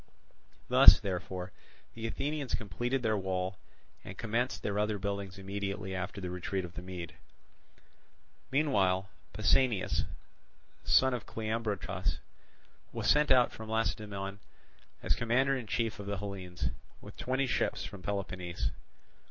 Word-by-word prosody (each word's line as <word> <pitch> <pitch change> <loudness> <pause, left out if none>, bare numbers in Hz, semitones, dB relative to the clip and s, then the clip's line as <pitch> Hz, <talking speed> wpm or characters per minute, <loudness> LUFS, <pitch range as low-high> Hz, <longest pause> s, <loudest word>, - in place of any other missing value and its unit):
Thus, - - +10
therefore, 95 -1 -4 0.4
the 115 0 -4
Athenians 140 +1 -1
completed 120 +5 -2
their 110 -1 +2
wall, 95 -1 -2 0.4
and - - -8
commenced 115 +3 -1
their 105 0 0
other 105 0 +1
buildings 100 -1 -3
immediately 100 0 -3
after 95 +2 -3
the 90 -2 -4
retreat 90 +1 -2
of 85 - -10
the 90 - -6
Mede. 90 -2 -6 1.4
Meanwhile 100 -10 +2 0.2
Pausanias, 120 -8 +2 0.8
son 130 0 +5
of 120 - -4
Cleombrotus, 105 -4 -2 0.7
was - - -3
sent 150 0 +4
out 125 -2 +6
from 110 0 -8
Lacedaemon 105 -3 -2 0.6
as - - +3
commander 130 +4 +2
in 125 -4 -4
chief 115 -2 -1
of 100 - -6
the 100 -1 -1
Hellenes, 90 -8 -4 0.3
with - - -11
twenty 130 +2 0
ships 125 - 0
from 100 -2 -8
Peloponnese. 95 -2 -2
100 Hz, 125 wpm, -32 LUFS, 95-115 Hz, 1.4 s, Thus